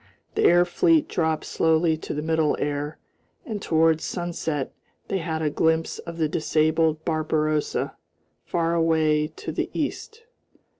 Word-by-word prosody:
The - - +1
air 175 +1 +6
fleet 320 - +3
dropped 160 -2 -1
slowly 160 0 +2
to 155 - -6
the 150 - -3
middle 160 -1 +1
air, 145 +1 -2 0.5
and 215 -4 -4
towards 160 -2 +2
sunset 165 -5 -3 0.4
they 195 - 0
had 160 -2 -3
a 150 - +1
glimpse 160 +1 +1
of 170 -1 -8
the 160 -2 +1
disabled 155 0 +1
Barbarossa 155 -1 0 0.5
far 170 -1 0
away 160 -2 +2
to 155 - -7
the - - -2
east. 450 +1 -4
160 Hz, 140 wpm, -24 LUFS, 155-170 Hz, 0.5 s, air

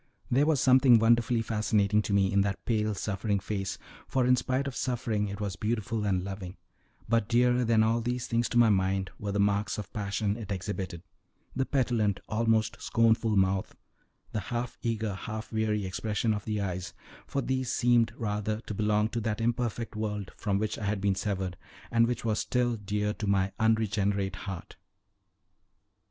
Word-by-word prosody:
There 140 +5 +4
was 155 -4 +3
something 130 -2 +6
wonderfully 115 +1 +3
fascinating 105 -1 +2
to 105 - -4
me 100 0 +3
in 100 - +4
that 100 0 -2
pale, 110 -2 0
suffering 100 0 -1
face, 100 -1 -3 0.3
for, 130 -2 +1
in 125 +1 +5
spite 130 +2 -1
of 135 -3 -4
suffering, 115 -4 -1
it 100 0 -6
was 100 -3 -3
beautiful 110 0 -2
and 95 -3 +1
loving; 95 -1 -6 0.5
but 115 -2 +2
dearer 125 +1 +3
than 115 -2 +4
all 115 +1 +2
these 125 +1 -2
things 115 0 0
to - - -1
my 120 -1 +6
mind 95 -1 +1
were 105 -1 -3
the 100 - -1
marks 100 +1 +1
of 105 -4 -7
passion 105 0 -1
it 105 -3 -7
exhibited, 95 -3 -4 0.5
the 130 +1 0
petulant, 115 -7 +1
almost 110 0 +1
scornful 115 -1 +2
mouth, 95 0 +1
and - - -30 0.5
the 110 - -1
half 120 +4 -4
eager, 110 -3 -1
half 110 +3 -6
weary 105 -2 0
expression 105 +4 -1
of 105 -1 -4
the 105 -1 -1
eyes, 90 -2 -4 0.3
for 140 - -2
these 130 -1 -1
seemed 120 -2 +3
rather 105 0 -2
to 110 - -6
belong 105 +1 +2
to 115 0 -3
that 110 0 -2
imperfect 115 0 -1
world 105 -3 -3
from 100 -3 -1
which 105 +1 -2
I 105 - -4
had 100 0 0
been 100 0 +2
severed, 95 -2 -2 0.3
and 115 0 +4
which 120 -1 -3
was 110 -1 +1
still 120 -1 +1
dear 105 0 -2
to 105 - -5
my 100 -1 +2
unregenerate 105 -3 +1
heart. 95 -3 -7
110 Hz, 180 wpm, -29 LUFS, 100-115 Hz, 0.5 s, something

